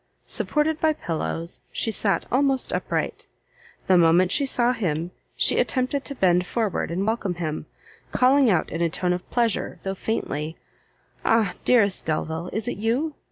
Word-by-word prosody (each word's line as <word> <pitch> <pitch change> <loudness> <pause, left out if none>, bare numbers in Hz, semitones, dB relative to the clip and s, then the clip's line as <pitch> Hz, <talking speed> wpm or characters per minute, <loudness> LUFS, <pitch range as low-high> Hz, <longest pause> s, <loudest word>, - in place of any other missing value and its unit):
Supported 305 +1 0
by 315 -1 +3
pillows, 165 - -4
she 225 - 0
sat 200 -1 +1
almost 270 0 +2
upright. - - -2 0.6
The 185 -1 +5
moment 175 +2 +4
she 280 -2 +2
saw 245 -1 +2
him, 170 -6 -2 0.2
she - - +3
attempted 260 +2 0
to 280 - -2
bend 180 -4 +2
forward 220 -5 -1
and 180 +4 -1
welcome 215 -5 -1
him, 155 -3 -4 0.4
calling 260 0 +4
out 175 -6 +1
in 165 - -3
a 170 - +2
tone 180 +2 0
of 180 - -6
pleasure, 235 -4 0
though 195 - -2
faintly, 160 -7 -3 0.7
"Ah! 220 -5 +2
dearest 205 -6 +3
Delvile! 160 +2 -2
is 220 +1 -2
it - - -3
you?" 250 +9 0
200 Hz, 160 wpm, -24 LUFS, 175-250 Hz, 0.7 s, The